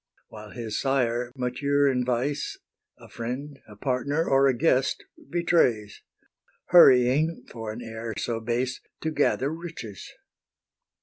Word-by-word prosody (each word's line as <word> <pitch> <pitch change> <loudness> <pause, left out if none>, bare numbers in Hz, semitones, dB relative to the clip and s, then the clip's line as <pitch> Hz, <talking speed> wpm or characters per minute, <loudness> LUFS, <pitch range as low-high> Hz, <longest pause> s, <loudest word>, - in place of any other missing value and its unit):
While 105 -1 -11
his 115 -3 -4
sire, 125 -3 0
mature 140 +3 +1
in 125 -2 +1
vice, 125 +4 -2 0.4
A - - -15
friend, 135 +5 -6
a 105 - -13
partner, 140 +7 -1
or 135 0 +4
a 135 - +3
guest 135 -2 +1 0.3
betrays, 140 - +1 0.7
Hurrying, 145 0 +5
for 115 -2 -6
an 115 +3 -7
heir 110 0 -6
so 115 -1 -2
base, 120 +3 -2 0.2
To 160 - -2
gather 145 -1 +1
riches. 160 - -8
125 Hz, 125 wpm, -26 LUFS, 115-145 Hz, 0.7 s, Hurrying